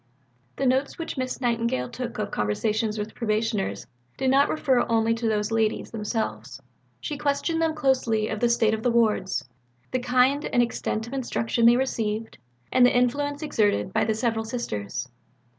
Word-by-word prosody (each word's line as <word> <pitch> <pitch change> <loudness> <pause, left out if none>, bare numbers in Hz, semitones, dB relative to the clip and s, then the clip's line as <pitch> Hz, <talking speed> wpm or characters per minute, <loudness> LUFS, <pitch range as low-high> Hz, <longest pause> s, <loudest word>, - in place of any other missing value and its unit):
The 270 - -1
notes 265 +2 +1
which 330 - -5
Miss 255 -2 -3
Nightingale 235 - 0
took 245 - -6
of 210 -1 -3
conversations 215 - -1
with 210 +1 -4
Probationers 215 - -1 0.3
did 260 -1 +1
not 275 +1 +4
refer 265 -5 +2
only 225 0 +3
to 230 0 -2
those 210 0 0
ladies 225 -1 0
themselves. 220 0 -3 0.4
She 295 -2 -5
questioned 300 +3 0
them 320 -1 +1
closely 255 -7 +1
of 220 - -3
the 240 - +2
state 225 -2 +3
of 220 - -2
the 245 - +1
wards, 210 - +1 0.4
the 255 - 0
kind 255 +4 +2
and 245 - +3
extent 225 -2 -2
of 235 - -9
instruction 235 -3 +1
they 240 +1 +6
received, 225 -4 -2 0.3
and 255 - +5
the 245 0 +5
influence 285 +4 0
exerted 205 -9 +1
by - - +2
the 220 0 0
several 225 0 0
Sisters. 130 - -4
230 Hz, 170 wpm, -25 LUFS, 215-255 Hz, 0.4 s, they